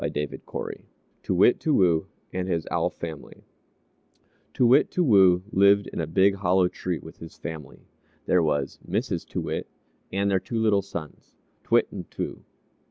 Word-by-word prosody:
TOO 95 - -1
WIT, 95 +7 +5
TOO 155 - 0
WOO 85 -4 +3 0.3
AND 90 0 -2
HIS 85 -4 -1
OWL - - +1
FAMILY 80 -3 -9 1.1
Too 125 - +2
Wit, 130 +5 +5
Too 180 - 0
Woo 95 - +5
lived 100 +1 +4
in - - -2
a 80 - -3
big 95 +5 +3
hollow 95 -1 +3
tree 90 -1 -4
with 80 - -12
his 80 - -11
family. 80 -5 -8 0.4
There 90 - +3
was 75 -3 -1
Mrs. - - -2
Too - - -3
Wit, - - -4 0.4
and 100 +1 0
their 95 - +3
two 115 +5 -5
little 110 -3 +3
sons, 85 -5 -9 0.3
T'wit - - +2
and - - -8
T'woo. - - -5
95 Hz, 160 wpm, -25 LUFS, 85-100 Hz, 1.1 s, WIT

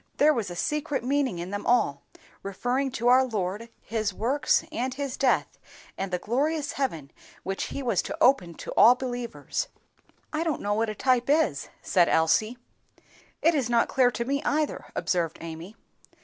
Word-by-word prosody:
"There 305 +1 +5
was 225 -8 -2
a 175 - -6
secret 295 - -2
meaning 265 -6 0
in 175 +2 -5
them 205 0 -4
all, 145 -13 +2 0.4
referring 245 +8 -1
to 240 -1 -1
our 255 +2 +6
Lord, 215 -1 -3
His 215 -3 -2
work, 255 +4 -2 0.2
and 255 -3 -2
His 275 -2 -3
death, 265 -2 +1 0.4
and 195 - -3
the 180 - +1
glorious 290 - -1
heaven 165 - -3 0.3
which 195 0 -3
He 280 - -5
was 230 -8 +1
to - - -6
open 185 -11 +3
to - - -7
all 240 +3 +7
believers." 245 -2 -4 0.7
"I 310 +2 0
don't 320 -5 -1
know 205 0 0
what 220 +1 0
a 215 - -4
type 250 +2 +1
is," 315 +2 +2
said 175 -3 +3
Elsie. 215 +9 +2 0.9
"It 330 - +5
is 270 -6 0
not 235 -1 +2
clear 255 -2 +4
to 235 0 -3
me 280 +2 -1
either," 300 0 -1
observed 170 -4 -1
Amy. 165 +5 -8
240 Hz, 175 wpm, -26 LUFS, 195-275 Hz, 0.9 s, all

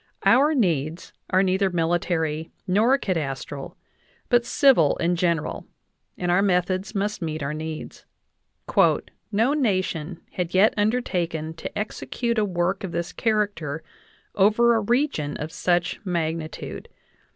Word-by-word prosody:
Our 295 +4 +5
needs 165 - 0 0.2
are 185 +1 +3
neither 190 +1 +2
military 165 -2 0 0.2
nor 215 +8 +3
cadastral, 145 - -4 0.5
but 240 -1 +3
civil 255 - +4
and 175 +1 +1
general, 170 -2 -1 0.5
and 175 -1 -1
our 180 +2 +4
methods 185 +1 0
must 205 +1 -1
meet 155 -2 -3
our 140 +2 -2
needs. 155 0 -7 1.2
"No 225 +7 +2
nation 185 - -1
had 180 -1 -3
yet 200 +4 +5
undertaken 180 -8 -1
to 165 - -7
execute 230 +2 -2
a 210 - +2
work 180 0 -1
of 185 -3 -5
this 170 0 -3
character 200 -9 -1 0.5
over 215 +4 +4
a 225 - +3
region 235 - 0
of 155 +2 -5
such 175 +4 0
magnitude. 165 -3 -3
180 Hz, 125 wpm, -24 LUFS, 160-210 Hz, 1.2 s, Our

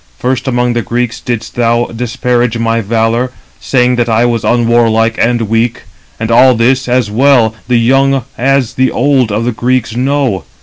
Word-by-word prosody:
First 130 +1 -2
among 125 -1 0
the 120 - -1
Greeks 120 0 -3
didst 115 -2 -5
thou 120 0 +1
disparage 120 0 -1
my 115 0 0
valour, 115 +3 -1 0.3
saying 125 -1 +1
that 120 -1 0
I 115 +1 +2
was 120 -2 -1
unwarlike 115 -1 +1
and 120 0 +1
weak; 115 +2 -1 0.3
292 - - -19
and 115 0 -2
all 130 +2 +5
this, 125 +3 +1
as 125 -4 0
well 120 -1 +3
the 125 -1 +2
young 135 +2 +2
as 135 -1 0
the 130 0 +1
old 130 -3 +1
of 110 +3 -1
the 125 - 0
Greeks 120 0 -1
know. 130 - -1
120 Hz, 175 wpm, -11 LUFS, 115-125 Hz, 0.3 s, all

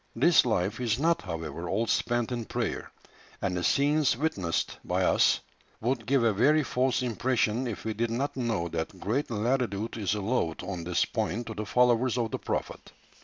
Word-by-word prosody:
This - - +5
life 95 +6 0
is 115 -3 +1
not, 165 +4 +2
however, 80 -1 -5
all 110 +4 +1
spent 120 +1 0
in 120 -2 -3
prayer, - - -3 0.5
and 90 -2 -1
the 90 - -2
scenes 145 0 +3
witnessed 100 - -1
by - - 0
us - - +3 0.4
would 120 -1 -1
give 135 -1 +3
a 115 -2 +3
very 145 +9 +4
false 125 0 0
impression 125 0 0
if 110 -5 -5
we 110 - -1
did 115 +2 -1
not 130 +5 -2
know 115 -9 -1
that 85 +3 -4
great 125 +11 -1
latitude 115 -2 -1
is 105 -1 0
allowed 100 -6 -1
on 90 -2 -5
this 90 0 +1
point 115 +9 -2
to 110 - -6
the 105 -1 -5
followers 125 +1 +3
of 115 -2 -1
the - - -3
prophet." - - -4
115 Hz, 180 wpm, -28 LUFS, 100-125 Hz, 0.5 s, This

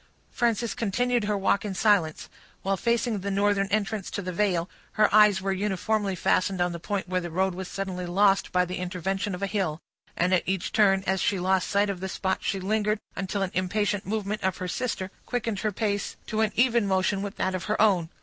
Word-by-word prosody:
Frances 235 -2 0
continued 240 +2 0
her 210 -1 0
walk 195 +1 +1
in 205 -3 -4
silence. 180 -6 +2 0.4
While 195 0 +1
facing 235 +2 0
the 200 +2 -4
northern 200 0 +2
entrance 205 0 -1
to 205 - -4
the 185 0 -4
vale, 180 -3 +1 0.3
her 215 -1 +3
eyes 210 -3 +6
were 195 0 0
uniformly 200 +1 -1
fastened 185 +2 +1
on 175 0 +1
the 170 - -6
point 200 +3 -3
where 185 0 0
the 175 - -5
road 190 +3 0
was 185 +1 -6
suddenly 180 -1 -4
lost 195 +2 +3
by 180 0 +3
the 180 +1 -5
intervention 185 +2 -2
of 190 - -6
a - - +3
hill; 185 -6 -1 0.4
and 180 +2 +2
at 185 - +4
each 190 -1 -1
turn, 195 -3 +4
as 190 -1 +1
she 205 -5 +1
lost 185 +1 +1
sight 205 +1 +2
of 190 - -6
the 190 +1 -4
spot, 190 0 -1
she 195 - -1
lingered 210 +2 0 0.2
until 195 +1 -2
an 185 - -3
impatient 205 +2 0
movement 210 0 -2
of 190 -1 0
her 185 - -4
sister 190 -2 -3 0.2
quickened 230 -4 -2
her 215 0 0
pace 205 0 -2
to 220 -1 -1
an 220 -1 +2
even 235 -3 +3
motion 190 +1 +1
with 200 0 -5
that 190 - 0
of 185 - -3
her 210 - -1
own. 185 -7 +3
195 Hz, 215 wpm, -26 LUFS, 185-210 Hz, 0.4 s, eyes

